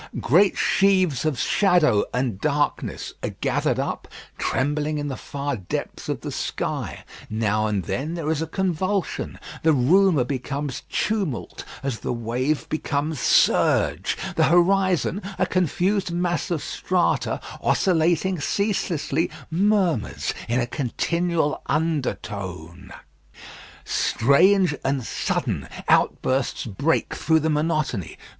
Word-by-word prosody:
Great 185 Hz, +9 st, +4 dB
sheaves 185 Hz, -8 st, +2 dB
of 155 Hz, -5 st, 0 dB
shadow 175 Hz, -, +3 dB
and 125 Hz, -6 st, -2 dB
darkness 145 Hz, -1 st, -1 dB
are -, -, -4 dB
gathered -, -, 0 dB
up, -, -, -3 dB, 0.3 s
trembling 150 Hz, +3 st, 0 dB
in 145 Hz, 0 st, -3 dB
the 135 Hz, -, -3 dB
far 140 Hz, +1 st, -4 dB
depths 95 Hz, -6 st, -5 dB
of -, -, -2 dB
the -, -, -5 dB
sky. -, -, -3 dB, 0.3 s
Now 110 Hz, 0 st, 0 dB
and 105 Hz, -3 st, -1 dB
then 135 Hz, -, -3 dB
there 160 Hz, -2 st, -2 dB
is 160 Hz, -1 st, -1 dB
a 160 Hz, -, -2 dB
convulsion. 190 Hz, +2 st, -1 dB, 0.2 s
The 160 Hz, 0 st, +4 dB
rumour 160 Hz, +3 st, +4 dB
becomes 135 Hz, +1 st, -4 dB
tumult 195 Hz, -, -2 dB, 0.2 s
as 135 Hz, -4 st, -2 dB
the -, -, -3 dB
wave 125 Hz, +6 st, -1 dB
becomes 155 Hz, -1 st, -2 dB
surge. -, -, +3 dB, 0.2 s
The -, -, +4 dB
horizon, 185 Hz, +2 st, +3 dB, 0.2 s
a 185 Hz, -, +2 dB
confused 185 Hz, +2 st, 0 dB
mass 175 Hz, -1 st, -1 dB
of 170 Hz, -4 st, -1 dB
strata, 180 Hz, -1 st, 0 dB, 0.2 s
oscillating 175 Hz, 0 st, +2 dB
ceaselessly, 170 Hz, -3 st, 0 dB, 0.2 s
murmurs 185 Hz, -, +1 dB, 0.2 s
in 120 Hz, +2 st, +2 dB
a 120 Hz, -, +1 dB
continual 160 Hz, +5 st, -1 dB
undertone. 100 Hz, -, -3 dB, 0.9 s
Strange 175 Hz, -, +3 dB
and 135 Hz, -1 st, 0 dB
sudden -, -, -2 dB, 0.2 s
outbursts 130 Hz, 0 st, +1 dB
break 140 Hz, +9 st, 0 dB
through 160 Hz, 0 st, +2 dB
the 160 Hz, +1 st, +1 dB
monotony. 150 Hz, -, -1 dB
155 Hz, 115 wpm, -23 LUFS, 130-180 Hz, 0.9 s, Great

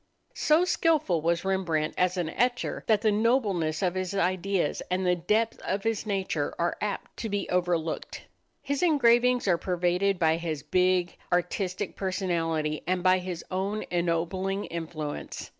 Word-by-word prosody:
So 315 Hz, +4 st, +3 dB
skilful 310 Hz, -, +2 dB
was 170 Hz, +3 st, 0 dB
Rembrandt 170 Hz, -5 st, 0 dB
as 180 Hz, 0 st, +1 dB
an 170 Hz, -3 st, -1 dB
etcher 245 Hz, +6 st, -1 dB
that 215 Hz, -2 st, +3 dB
the 220 Hz, -1 st, +3 dB
nobleness 205 Hz, -8 st, +1 dB
of 180 Hz, -2 st, +1 dB
his 185 Hz, +1 st, -3 dB
ideas 185 Hz, -2 st, 0 dB
and 185 Hz, +1 st, 0 dB
the 180 Hz, 0 st, +3 dB
depth 215 Hz, +6 st, 0 dB
of 195 Hz, +1 st, -2 dB
his 225 Hz, -1 st, -1 dB
nature 190 Hz, -7 st, -1 dB
are 170 Hz, 0 st, 0 dB
apt 210 Hz, -1 st, -4 dB
to 225 Hz, -, -4 dB
be 205 Hz, 0 st, -2 dB
overlooked. 175 Hz, -3 st, -1 dB, 0.4 s
His 280 Hz, -1 st, -1 dB
engravings 250 Hz, -, +4 dB
are 175 Hz, -3 st, +3 dB
pervaded 180 Hz, +2 st, +1 dB
by 160 Hz, -2 st, +3 dB
his 160 Hz, -4 st, -4 dB
big, 180 Hz, -1 st, +2 dB, 0.2 s
artistic 185 Hz, +2 st, -1 dB
personality 165 Hz, -5 st, -1 dB
and 180 Hz, 0 st, 0 dB
by 185 Hz, 0 st, +5 dB
his 180 Hz, -2 st, -6 dB
own 195 Hz, +3 st, -1 dB
ennobling 175 Hz, +3 st, -1 dB
influence. 160 Hz, -3 st, -5 dB
185 Hz, 150 wpm, -27 LUFS, 170-205 Hz, 0.4 s, by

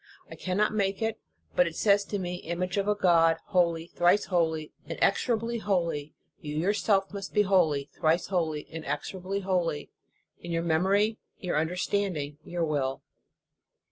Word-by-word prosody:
I -, -, -7 dB
cannot 200 Hz, +4 st, 0 dB
make 195 Hz, -2 st, 0 dB
it, 225 Hz, -1 st, -1 dB, 0.4 s
but 180 Hz, -, +4 dB
it 165 Hz, -, -6 dB
says 200 Hz, +1 st, +4 dB
to 205 Hz, -, -3 dB
me: 180 Hz, -2 st, -3 dB
Image 180 Hz, +1 st, -3 dB
of 200 Hz, 0 st, 0 dB
a 210 Hz, -, +3 dB
God 165 Hz, -4 st, +4 dB
holy, 170 Hz, -3 st, +2 dB
thrice 175 Hz, +4 st, +2 dB
holy, 160 Hz, -4 st, 0 dB, 0.2 s
inexorably 235 Hz, -1 st, +1 dB
holy, 170 Hz, -8 st, -1 dB, 0.2 s
you 150 Hz, -1 st, -6 dB
your 175 Hz, +7 st, +2 dB
self 200 Hz, -2 st, +1 dB
must 195 Hz, -1 st, -6 dB
be 210 Hz, -, +5 dB
holy, 165 Hz, -8 st, +2 dB
thrice 160 Hz, +2 st, +2 dB
holy, 160 Hz, -5 st, -1 dB
inexorably 185 Hz, +4 st, -4 dB
holy, 180 Hz, -5 st, -1 dB, 0.5 s
in 170 Hz, -, -7 dB
your 165 Hz, 0 st, 0 dB
memory, 195 Hz, +7 st, +2 dB, 0.2 s
your 180 Hz, -, -3 dB
understanding, 160 Hz, -2 st, -1 dB
your 170 Hz, 0 st, -2 dB
will. 140 Hz, -4 st, -1 dB
180 Hz, 150 wpm, -28 LUFS, 160-200 Hz, 0.5 s, be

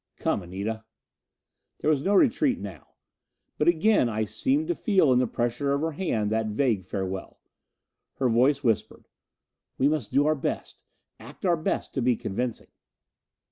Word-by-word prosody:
"Come, -, -, -1 dB
Anita." 100 Hz, +5 st, -5 dB, 1.0 s
There -, -, 0 dB
was 145 Hz, -3 st, +1 dB
no 200 Hz, +7 st, +1 dB
retreat 265 Hz, +4 st, +3 dB
now. 95 Hz, -6 st, -10 dB, 0.6 s
But 150 Hz, -, +2 dB
again 170 Hz, -, +4 dB
I 110 Hz, -1 st, -1 dB
seemed 280 Hz, -, 0 dB
to -, -, +3 dB
feel 190 Hz, -, +3 dB
in 125 Hz, -, +4 dB
the 125 Hz, -, +2 dB
pressure 120 Hz, +5 st, -1 dB
of 140 Hz, -, 0 dB
her 160 Hz, +1 st, -1 dB
hand 115 Hz, -, -1 dB
that 110 Hz, 0 st, 0 dB
vague 105 Hz, -3 st, 0 dB
farewell. 95 Hz, -1 st, -5 dB, 0.8 s
Her 130 Hz, -, +1 dB
voice 130 Hz, +5 st, +3 dB
whispered, 115 Hz, -5 st, -1 dB, 0.7 s
"We 135 Hz, -, +3 dB
must 145 Hz, -8 st, -1 dB
do 140 Hz, +1 st, +3 dB
our 155 Hz, -, +3 dB
best, 145 Hz, -, -4 dB, 0.4 s
act 135 Hz, -, -10 dB
our 175 Hz, -2 st, +4 dB
best 160 Hz, -, -2 dB
to 135 Hz, -, -1 dB
be 125 Hz, 0 st, +3 dB
convincing." 120 Hz, +4 st, -4 dB
130 Hz, 160 wpm, -26 LUFS, 110-155 Hz, 1.0 s, again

